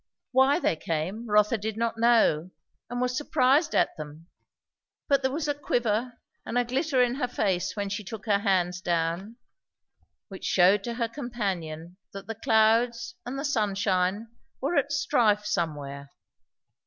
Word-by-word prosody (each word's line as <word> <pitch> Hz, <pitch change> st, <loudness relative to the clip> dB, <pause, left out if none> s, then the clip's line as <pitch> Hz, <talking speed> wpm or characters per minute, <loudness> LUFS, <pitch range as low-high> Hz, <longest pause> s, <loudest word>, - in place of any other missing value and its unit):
Why 265 Hz, +2 st, +4 dB
they 345 Hz, -, +1 dB
came 170 Hz, +9 st, -4 dB
Rotha 210 Hz, +2 st, +3 dB
did 215 Hz, +1 st, -4 dB
not 230 Hz, 0 st, -1 dB
know, 225 Hz, -9 st, +3 dB, 0.4 s
and 245 Hz, +1 st, -3 dB
was 250 Hz, 0 st, 0 dB
surprised 290 Hz, +3 st, +2 dB
at -, -, +2 dB
them; 155 Hz, +1 st, -9 dB, 0.8 s
but 280 Hz, -2 st, +3 dB
there 265 Hz, -, +1 dB
was 300 Hz, +2 st, -2 dB
a 290 Hz, -, +1 dB
quiver 240 Hz, -4 st, -1 dB, 0.3 s
and 245 Hz, -, -3 dB
a 245 Hz, -, +2 dB
glitter 265 Hz, +1 st, +1 dB
in 245 Hz, -1 st, 0 dB
her 255 Hz, -1 st, -1 dB
face 190 Hz, -7 st, -1 dB
when 205 Hz, -1 st, -2 dB
she 205 Hz, +2 st, -4 dB
took 215 Hz, +3 st, -8 dB
her 205 Hz, -3 st, +2 dB
hands 185 Hz, -3 st, 0 dB
down, 175 Hz, +5 st, -1 dB, 0.9 s
which 195 Hz, -3 st, -10 dB
shewed 190 Hz, +2 st, +4 dB
to 235 Hz, -1 st, -3 dB
her 235 Hz, -1 st, -1 dB
companion 185 Hz, -, -5 dB, 0.2 s
that 195 Hz, 0 st, -8 dB
the 225 Hz, -, -4 dB
clouds 230 Hz, -, +2 dB
and 260 Hz, +2 st, -4 dB
the 275 Hz, -, -3 dB
sunshine 205 Hz, -4 st, 0 dB, 0.3 s
were 290 Hz, +6 st, -1 dB
at 285 Hz, -1 st, +1 dB
strife 235 Hz, -8 st, +2 dB
somewhere. 145 Hz, -8 st, -3 dB
220 Hz, 155 wpm, -27 LUFS, 185-250 Hz, 0.9 s, Why